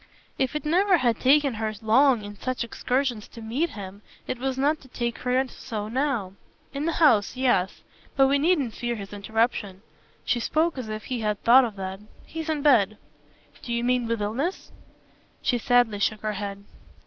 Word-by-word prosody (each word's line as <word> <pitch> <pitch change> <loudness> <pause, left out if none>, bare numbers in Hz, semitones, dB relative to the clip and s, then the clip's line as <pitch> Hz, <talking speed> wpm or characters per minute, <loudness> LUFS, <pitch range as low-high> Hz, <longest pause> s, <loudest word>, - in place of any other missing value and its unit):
If 265 +1 0
it 300 - -3
never 365 +4 +4
had 240 -6 +1
taken 280 0 +4
her 215 -1 -3
long 235 +2 +4
in 205 0 -8
such 255 +4 -3
excursions 245 -1 -2
to - - -13
meet 245 +10 -1
him 200 -5 -9 0.2
it 250 - -4
was 265 0 -2
not 295 +3 +1
to 265 - -15
take 235 -2 -3
her 255 +1 +1
so 215 -4 -6
now. 245 -7 -1 0.4
"In 280 +2 -3
the 335 - 0
house, 255 -9 +3
yes. 245 -8 +1 0.3
But 270 - +5
we 280 +1 +3
needn't 295 -7 +1
fear 240 +1 -3
his 200 -2 -8
interruption" 205 -1 -1 0.4
she 240 - +1
spoke 320 +7 +1
as 230 -4 -6
if 215 0 -5
he 250 -2 -3
had 210 -2 -1
thought 255 +2 +7
of 220 -4 -6
that. 190 0 -5 0.3
"He's 320 0 -6
in 300 -2 -1
bed." 215 -8 +4 0.6
"Do 240 - -7
you 235 0 0
mean 245 -1 +1
with 230 -2 -1
illness?" 270 - -3 0.7
She 245 - +1
sadly 240 -3 +2
shook 215 +1 0
her 215 0 -2
head. 200 0 -5
240 Hz, 185 wpm, -25 LUFS, 215-270 Hz, 0.7 s, thought